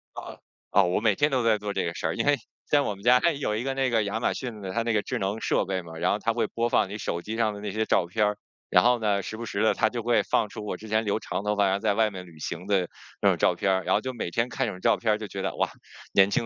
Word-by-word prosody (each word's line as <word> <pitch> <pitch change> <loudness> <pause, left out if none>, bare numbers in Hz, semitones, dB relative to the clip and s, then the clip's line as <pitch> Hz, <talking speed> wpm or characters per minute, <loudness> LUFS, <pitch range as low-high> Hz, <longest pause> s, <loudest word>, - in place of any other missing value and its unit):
哦， - - -8 0.3
哦， - - +5
我 90 +3 +1
每 110 -3 +3
天 145 +6 +2
都 130 -3 +1
在 110 -2 +3
做 105 -1 -4
这 95 - -1
个 85 - -2
事 80 - -3
儿。 80 - -2
因 - - -1
为， 145 0 +5 0.3
像 145 -1 +4
我 105 - -2
们 100 - -15
家 125 +2 +6
有 140 -7 -2
一 110 - -2
个 135 0 -1
那 135 -1 +1
个， 115 -3 +2
亚 100 +2 -2
马 - - +1
逊 120 -5 -6
的 95 -1 -5
它 115 - 0
那 115 - 0
个 105 - +2
智 - - -3
能 100 +3 -2
设 - - +1
备 95 -1 -2
嘛， 80 -2 -10
然 90 +2 +1
后 105 - 0
它 115 +1 0
会 120 - 0
播 115 +1 -1
放 95 - +2
你 105 - -5
手 85 -4 -3
机 110 +4 -5
上 110 -2 +1
的 100 - -8
那 105 -1 -4
些 110 +2 -1
照 - - +2
片 105 +5 +1
儿。 105 0 0 0.3
然 90 - +5
后 120 -1 +4
呢， 100 -2 +1
时 110 - -5
不 115 0 -6
时 100 - -1
地 110 - +4
它 110 - +2
就 120 -1 -4
会 120 +1 +3
放 105 - +1
出 105 - -8
我 100 -3 -4
之 110 - -11
前 110 +1 +1
留 105 0 0
长 100 - -4
头 105 0 0
发， 100 -1 +3
然 95 - +2
后 100 - 0
在 105 -1 +1
外 110 -1 +2
面 90 -1 -8
旅 80 -2 -15
行 85 +4 -5
的 95 -4 +2 0.3
那 - - +2
种 - - +5
照 90 - +2
片 95 +1 +1
儿， 95 -1 +1
然 - - +2
后 - - +3
就 130 +3 -5
每 115 -7 -4
天 115 +6 0
看 - - -2
这 - - -2
种 90 - -9
照 - - +3
片 110 -2 0
儿 - - 0
就 110 -1 -6
觉 100 -1 -5
得， - - -2
哇， - - 0 0.4
年 95 0 +6
轻 115 - 0
105 Hz, 365 characters per minute, -26 LUFS, 95-115 Hz, 0.4 s, 家